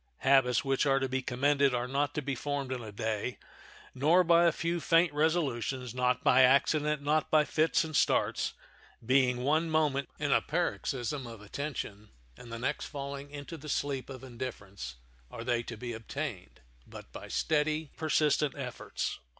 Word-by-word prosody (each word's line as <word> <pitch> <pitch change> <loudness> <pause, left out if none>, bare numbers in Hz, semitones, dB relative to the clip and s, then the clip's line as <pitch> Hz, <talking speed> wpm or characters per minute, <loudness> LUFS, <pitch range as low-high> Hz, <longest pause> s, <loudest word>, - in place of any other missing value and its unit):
Habits 135 -2 +4
which 135 +1 +1
are 135 0 +4
to 135 0 0
be 130 0 -1
commended 140 +1 +2
are 120 +1 -1
not 140 +2 -1
to 150 - -2
be 140 +1 -2
formed 140 0 -3
in 130 -2 -3
a 110 -2 -8
day, 110 +1 -3 0.6
nor 155 +8 +4
by 170 0 +5
a 170 - +5
few 170 +2 -2
faint 165 0 +3
resolutions, 135 -6 0
not 125 0 +1
by 125 - +6
accident, 145 +3 +3
not 150 +1 +1
by 155 -1 +4
fits 160 +2 +2
and 155 -1 -6
starts—being 125 -1 0
one 155 +4 +2
moment 150 -3 +1
in 145 -1 -1
a - - +4
paroxysm 140 -5 -2
of 115 -2 -9
attention 110 -4 -5 0.3
and 120 - -12
the 115 - -4
next 135 +5 -2
falling 140 -1 -6
into 145 +3 -8
the 150 0 -9
sleep 135 -2 -2
of 130 -1 -8
indifference—are 95 - -8
they 120 -1 +1
to 120 -1 -8
be 120 +1 -5
obtained, 115 - -6 0.3
but - - -11
by - - -9
steady, 155 0 0
persistent 150 -2 +1
efforts. 125 -3 -4
135 Hz, 165 wpm, -30 LUFS, 125-150 Hz, 0.6 s, by